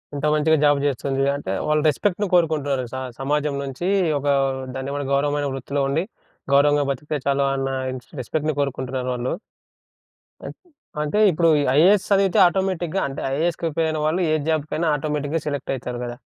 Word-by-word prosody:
ఎంత 145 +1 -3
మంచిగా 155 +1 +3
జాబ్ 145 -1 +4
చేస్తుంది. 135 0 -1
అంటే, 95 -9 -4
వాళ్ళు 150 0 +2
రెస్పెక్ట్‌ని 205 +6 0
కోరుకుంటున్నారు 150 -6 +2
స - - -4 0.2
సమాజం 145 +1 0
నుంచి 135 +6 -4 0.3
ఒక 145 - -4 0.5
దాన్నేమంటారు 140 +1 -4
గౌరవమైన 145 +1 +1
వృత్తిలో 140 +2 -3
ఉండి, 160 +5 0 0.5
గౌరవంగా 145 +1 +4
బ్రతికితే 145 +3 -3
చాలు 140 0 +2
అన్న 135 0 -2 0.2
ఇన్స్ 125 -1 -9
రెస్పెక్ట్‌ని 155 +4 -2
కోరుకుంటున్నారు 130 -2 -3
వాళ్ళు. 125 +1 -2 1.1
అన్ - - -6 0.5
అంటే, 150 +8 0
ఇప్పుడు 165 +1 +2
ఈ - - +1
ఐఏఎస్ 190 +5 +5
చదివితే 195 -2 +3
ఆటోమేటిక్‌గా 190 -1 -1
అంటే, 135 - -6
ఐఏఎస్‌కి 170 +3 -1
ప్రిపేరైన 160 0 -1
వాళ్ళు 170 +4 +1
ఏ - - +4
జాబ్‌కైనా 155 +1 0
ఆటోమేటిక్‌గా 150 +1 -2
సెలెక్టయితరు 130 -3 -4
కదా! 120 0 -6
145 Hz, 150 wpm, -22 LUFS, 135-160 Hz, 1.1 s, ఐఏఎస్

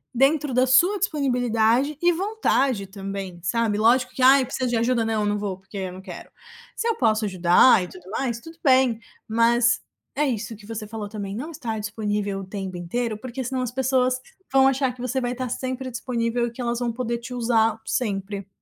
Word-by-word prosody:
dentro 275 +2 +2
da 255 +1 +4
sua 350 +11 +5
disponibilidade 250 - +1
e 350 0 +4
vontade 275 - 0
também, 195 -2 -6
sabe, 215 +3 +1
lógico 250 +4 +3
que 260 - -5
"ai, 270 +1 +7
eu - - -1
preciso 255 0 -2
de 240 - +1
ajuda". 235 0 +1
"Não, 220 -1 0
eu - - 0
não 205 0 0
vou, 200 -2 -3
porque 195 +2 -17
eu 190 -2 -3
não 185 +1 -10
quero". 190 -2 -10 0.5
Se 460 - -2
eu 460 - +1
posso 220 -2 +2
ajudar 185 +2 +5
e - - -6
tudo 185 0 -13
mais, 235 -1 -2
tudo 325 +6 -13
bem, 255 -5 +4 0.3
mas 230 +1 +3 0.3
é 295 +2 +2
isso 230 -4 -3
que 210 0 -15
você 220 -2 -5
falou 210 -2 -6
também, 205 -2 -5
não 295 +8 -5
estar 230 -8 -4
disponível 210 -2 -2
o 190 - -8
tempo 190 -2 -5
inteiro, 215 +6 -2
porque 255 +3 -6
senão 255 +1 -2
as 245 -2 -2
pessoas 255 0 +1 0.4
vão 265 0 +5
achar 265 -1 +1
que 245 - -12
você 255 +1 -1
vai 245 -1 -2
tá 255 -1 -4
sempre 260 +1 -4
disponível 235 -1 -1
e - - -6
que 240 +2 -8
elas 235 0 -1
vão 240 -2 -1
poder 235 0 -2
te 245 +2 -8
usar 225 -2 +1
sempre. 200 -3 -2
235 Hz, 210 wpm, -24 LUFS, 210-260 Hz, 0.5 s, ai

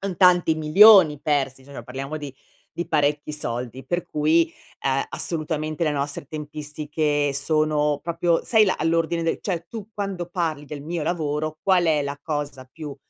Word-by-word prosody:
Son 195 -2 -4
tanti 175 -2 +5
milioni 155 0 +7
persi, 135 -3 -1
cioè 140 -3 -9
parliamo 135 +5 -6
di 145 -3 -7 0.4
di 170 -1 -5
parecchi 150 -1 0
soldi, 125 -2 -3
per 175 +4 -2
cui, 160 +1 +2 0.3
uhm, 135 0 +1
assolutamente 155 -1 -2
le 155 - +2
nostre 145 0 -3
tempistiche 150 0 -2
sono 150 0 +1
proprio, 170 0 0
sai 220 -2 +5
la 190 - 0
all'ordine 165 +1 0
del 165 - 0
cioè 175 -4 -3
tu 215 -3 -8
quando 195 -4 -4
parli 165 -4 -3
del 145 0 -8
mio 165 +2 -4
lavoro, 155 -1 -2
qual 185 -3 +3
è 155 -2 +2
la 140 0 -4
cosa 145 -4 -4
più 150 -3 -8
155 Hz, 160 wpm, -23 LUFS, 145-170 Hz, 0.4 s, milioni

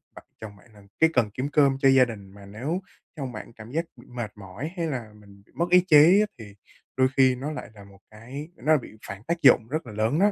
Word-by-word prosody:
bạ - - -11 0.2
chồng 105 -2 -9
bạn 110 +3 -22
là 105 - -17 0.2
cái 160 - +5
cần 120 -6 +2
kiếm 130 +4 -3
cơm 140 -3 +3
cho 135 - +5
gia 135 -1 +6
đình, 100 -5 -9
mà 100 0 -14
nếu 130 - -4 0.3
chồng 135 -5 -5
bạn 120 - -9
cảm 110 0 -12
giác 165 +4 -1
bị 120 - -17
mệt 120 -3 -6
mỏi 100 - -7
hay 170 -1 -1
là 120 -8 -5
mình 100 -1 -18
bị - - -29
mất 170 +1 -1
ý 180 +1 +7
chí 165 +4 +7
á 210 - +3
thì 105 -3 -11 0.4
đôi 130 0 +4
khi 130 -1 +5
nó 135 +5 -5
lại 145 - -7
là 100 -2 -14
một 100 0 -18
cái 125 +8 -9
nó - - -18
lại 155 - +6
bị 120 -4 -10
phản 100 +1 -8
tác 170 +6 -3
dụng 115 - +6
rất 155 +5 -3
là 115 - -9
lớn 110 +8 0
đó. 205 +2 +4
125 Hz, 270 wpm, -25 LUFS, 105-150 Hz, 0.4 s, ý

